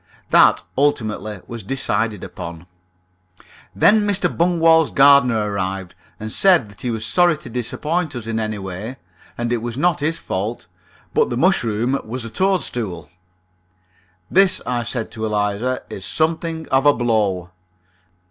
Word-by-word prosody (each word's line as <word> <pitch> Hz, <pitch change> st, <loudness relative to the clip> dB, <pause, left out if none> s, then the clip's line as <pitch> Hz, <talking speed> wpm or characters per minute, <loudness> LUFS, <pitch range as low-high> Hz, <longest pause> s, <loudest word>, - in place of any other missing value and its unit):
That -, -, +5 dB, 0.2 s
ultimately 110 Hz, -7 st, -1 dB
was 120 Hz, -1 st, -7 dB
decided 110 Hz, -2 st, -2 dB
upon. 85 Hz, 0 st, -8 dB, 1.1 s
Then 210 Hz, -, +5 dB
Mr. 200 Hz, -4 st, 0 dB
Bungwall's 165 Hz, -2 st, +4 dB
gardener 125 Hz, -7 st, +4 dB
arrived, 95 Hz, -2 st, -3 dB, 0.3 s
and 110 Hz, 0 st, -6 dB
said 175 Hz, -, +4 dB
that 105 Hz, -, -16 dB
he 125 Hz, -, -2 dB
was 115 Hz, -1 st, -2 dB
sorry 175 Hz, -, +3 dB
to 150 Hz, -, -11 dB
disappoint 150 Hz, +7 st, -2 dB
us 120 Hz, -3 st, -6 dB
in 115 Hz, 0 st, -2 dB
any 110 Hz, -1 st, -3 dB
way, 95 Hz, +5 st, -6 dB, 0.4 s
and 120 Hz, 0 st, -1 dB
it -, -, +1 dB
was 120 Hz, +1 st, -5 dB
not 175 Hz, +3 st, +2 dB
his 155 Hz, +3 st, -1 dB
fault, 105 Hz, +5 st, -4 dB, 0.5 s
but -, -, +2 dB
the 120 Hz, -, -2 dB
mushroom 125 Hz, -, +1 dB
was 115 Hz, +2 st, -5 dB
a 115 Hz, -, -7 dB
toadstool. 115 Hz, -, -2 dB, 1.2 s
"This," 195 Hz, 0 st, +4 dB
I 125 Hz, -1 st, -1 dB
said 115 Hz, 0 st, -4 dB
to 110 Hz, 0 st, -4 dB
Eliza, 105 Hz, +4 st, -1 dB
"is 95 Hz, -, -7 dB
something 160 Hz, -, -1 dB
of 135 Hz, +2 st, +3 dB
a 145 Hz, -, +6 dB
blow." 105 Hz, -7 st, 0 dB
120 Hz, 145 wpm, -20 LUFS, 105-155 Hz, 1.2 s, a